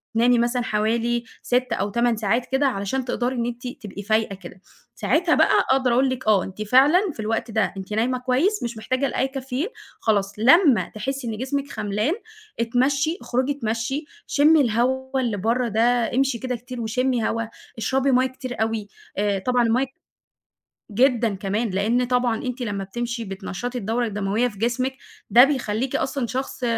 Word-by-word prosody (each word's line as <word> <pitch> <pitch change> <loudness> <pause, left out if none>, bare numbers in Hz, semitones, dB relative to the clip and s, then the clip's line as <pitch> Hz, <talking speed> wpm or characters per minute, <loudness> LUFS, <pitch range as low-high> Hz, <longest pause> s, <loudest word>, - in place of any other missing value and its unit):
وتنامي 240 +1 +4
مثلًا 240 +1 +1
حوالي 230 +2 0 0.2
6 250 +1 +1
أو 200 +2 -1
8 235 +2 +1
ساعات 225 +3 0
كده 270 +1 +3
علشان 245 +2 -2
تقدري 250 +1 -1
إن 235 -1 -1
أنتِ 240 +1 -5
تبقي 230 -7 -8
فايقة 215 -1 +1
كده، 185 -1 -12 0.3
ساعتها 340 +1 +2
بقى - - +4 0.2
أقدر 260 -2 +3
أقول 260 +2 +3
لِك 260 -3 -4
آه، 205 -4 +4
أنتِ 195 +2 -8
فعلًا 265 - +5
في - - -18
الوقت 225 +2 -2
ده 220 -1 0
أنتِ 190 +2 -6
نايمة 240 +4 +1
كويس 260 +12 +1
مش 235 -1 -4
محتاجة 255 +5 -1
لأي 265 +1 0
كافيين، 270 +3 -3 0.3
خلاص، 200 -3 +1
لمّا 265 - +5
تحسّي 265 +4 -3
إن 220 -2 -3
جسمِك 275 +3 -3
خَملان 210 +6 -1 0.5
اتمشّي، 275 +7 +1
اخرجي 255 +3 0
اتمشّي، 265 +2 -2 0.2
شمّي 300 +2 +5
الهوا 260 +2 0
اللي 235 -5 -1
برّا 235 +5 0
ده، 235 +2 +1
امشي 270 -1 +2
كده 255 +1 -2
كتير 245 +1 -7
وشمّي 245 +1 0
هوا، 230 0 -1 0.3
اشربي 265 +4 +1
مَيّة 255 +1 +4
كتير 255 -2 -6
أوي، 220 -2 -1 0.3
آآ، 200 -1 +1
طبعًا 245 +5 +1
المَيّة 235 +3 +2 1.1
جدًا 235 -1 +2
كمان 200 +4 -2
لإن 220 +6 +1
طبعًا 245 -2 0
أنتِ 255 0 -4
لمّا 200 -4 -3
بتمشي 235 +3 -4
بتنشّطي 195 +5 -5
الدورة 235 +2 -1
الدموية 210 +3 0
في 205 -4 -12
جسمِك، 255 +4 -1 0.3
ده 240 +5 +9
بيخلّيكِ 260 -3 -1
أصلًا 265 -2 -1
شخص 260 +1 -4
240 Hz, 170 wpm, -23 LUFS, 220-260 Hz, 1.1 s, ده